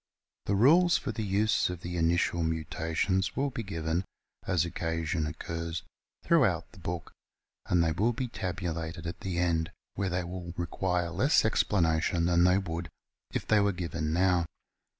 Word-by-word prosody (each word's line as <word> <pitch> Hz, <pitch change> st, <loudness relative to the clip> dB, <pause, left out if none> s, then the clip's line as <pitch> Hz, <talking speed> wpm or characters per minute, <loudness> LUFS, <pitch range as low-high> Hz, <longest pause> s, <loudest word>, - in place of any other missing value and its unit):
The 100 Hz, -, +1 dB
rules 165 Hz, -, +6 dB
for 130 Hz, -, -3 dB
the 110 Hz, 0 st, -3 dB
use 105 Hz, +1 st, +2 dB
of 90 Hz, -1 st, -5 dB
the 90 Hz, 0 st, -5 dB
initial 85 Hz, 0 st, +2 dB
mutations 80 Hz, +4 st, -1 dB
will 140 Hz, 0 st, 0 dB
be 120 Hz, -, -4 dB
given, 80 Hz, -3 st, -2 dB, 0.4 s
as 85 Hz, -3 st, +2 dB
occasion 80 Hz, -1 st, -2 dB
occurs, 80 Hz, +2 st, -4 dB, 0.4 s
throughout -, -, +2 dB
the -, -, -15 dB
book, 85 Hz, 0 st, -5 dB, 0.6 s
and 90 Hz, -1 st, +3 dB
they 80 Hz, -, +2 dB
will 105 Hz, +9 st, +2 dB
be 125 Hz, +2 st, -3 dB
tabulated 85 Hz, -5 st, -4 dB
at 85 Hz, -, -5 dB
the 95 Hz, -2 st, -3 dB
end, 85 Hz, -2 st, +1 dB, 0.2 s
where 100 Hz, -2 st, -1 dB
they 90 Hz, 0 st, -1 dB
will 85 Hz, -1 st, -6 dB
require 90 Hz, 0 st, -1 dB
less -, -, +3 dB
explanation 85 Hz, -2 st, +2 dB
than 85 Hz, 0 st, +4 dB
they 90 Hz, +1 st, +5 dB
would 85 Hz, -3 st, -3 dB, 0.4 s
if -, -, -2 dB
they 110 Hz, -, +4 dB
were 100 Hz, 0 st, +3 dB
given 80 Hz, -3 st, -3 dB
now. 90 Hz, 0 st, +2 dB
85 Hz, 160 wpm, -29 LUFS, 80-95 Hz, 0.6 s, rules